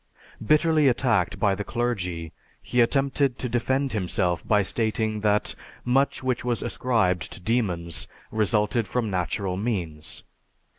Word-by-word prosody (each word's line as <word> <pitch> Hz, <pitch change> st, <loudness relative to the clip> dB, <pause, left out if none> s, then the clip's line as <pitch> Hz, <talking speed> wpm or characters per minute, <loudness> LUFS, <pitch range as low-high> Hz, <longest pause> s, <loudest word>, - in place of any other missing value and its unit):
Bitterly 155 Hz, +3 st, +4 dB
attacked 120 Hz, -7 st, +2 dB
by 100 Hz, -2 st, +3 dB
the 105 Hz, +1 st, -3 dB
clergy, 90 Hz, -9 st, -2 dB, 0.3 s
he 125 Hz, -, +1 dB
attempted 135 Hz, +1 st, +2 dB
to 125 Hz, -, -3 dB
defend 130 Hz, +3 st, 0 dB
himself 90 Hz, -3 st, 0 dB
by 105 Hz, -2 st, +4 dB
stating 110 Hz, +1 st, -1 dB
that 105 Hz, 0 st, +1 dB, 0.3 s
much 135 Hz, +2 st, +2 dB
which 130 Hz, -2 st, 0 dB
was 120 Hz, -1 st, 0 dB
ascribed 110 Hz, -8 st, 0 dB
to -, -, -8 dB
demons 90 Hz, -6 st, -1 dB, 0.2 s
resulted 105 Hz, +1 st, +1 dB
from 115 Hz, -4 st, -1 dB
natural 90 Hz, +1 st, -1 dB
means. 90 Hz, -8 st, -3 dB
110 Hz, 130 wpm, -25 LUFS, 95-125 Hz, 0.3 s, Bitterly